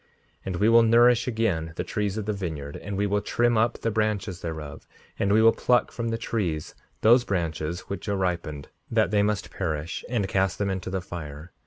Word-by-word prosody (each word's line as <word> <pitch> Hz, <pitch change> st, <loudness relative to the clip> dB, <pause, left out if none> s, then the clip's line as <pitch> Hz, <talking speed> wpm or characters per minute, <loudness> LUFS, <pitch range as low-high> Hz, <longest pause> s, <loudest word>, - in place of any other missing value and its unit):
5:58 -, -, -36 dB, 0.4 s
And 95 Hz, -, -2 dB
we 105 Hz, +5 st, +2 dB
will 115 Hz, 0 st, +7 dB
nourish 120 Hz, +1 st, +5 dB
again 100 Hz, -9 st, -1 dB
the -, -, -2 dB
trees 105 Hz, -1 st, -2 dB
of 110 Hz, -, -3 dB
the 105 Hz, -, -1 dB
vineyard, 80 Hz, -7 st, -5 dB
and 100 Hz, -1 st, -5 dB
we 100 Hz, -, +1 dB
will 105 Hz, 0 st, +1 dB
trim 120 Hz, +3 st, +1 dB
up 115 Hz, +2 st, +2 dB
the 115 Hz, -, 0 dB
branches 105 Hz, -4 st, -1 dB
thereof; 80 Hz, -3 st, -6 dB, 0.3 s
and 100 Hz, -, +1 dB
we 110 Hz, +2 st, +5 dB
will 115 Hz, -, +8 dB
pluck 125 Hz, -1 st, +2 dB
from 115 Hz, -1 st, -3 dB
the 115 Hz, -, -1 dB
trees 90 Hz, -9 st, -2 dB, 0.3 s
those 120 Hz, +3 st, +6 dB
branches 85 Hz, -4 st, -2 dB
which 100 Hz, +1 st, -6 dB
are 100 Hz, -, 0 dB
ripened, 85 Hz, -6 st, -2 dB, 0.2 s
that 95 Hz, -, +2 dB
must 105 Hz, -1 st, -1 dB
perish, 80 Hz, -3 st, -3 dB
and 115 Hz, -6 st, 0 dB
cast 95 Hz, -1 st, +1 dB
them 100 Hz, -1 st, 0 dB
into 95 Hz, -1 st, -4 dB
the 95 Hz, 0 st, -2 dB
fire. 80 Hz, -2 st, -8 dB
100 Hz, 205 wpm, -26 LUFS, 85-110 Hz, 0.4 s, will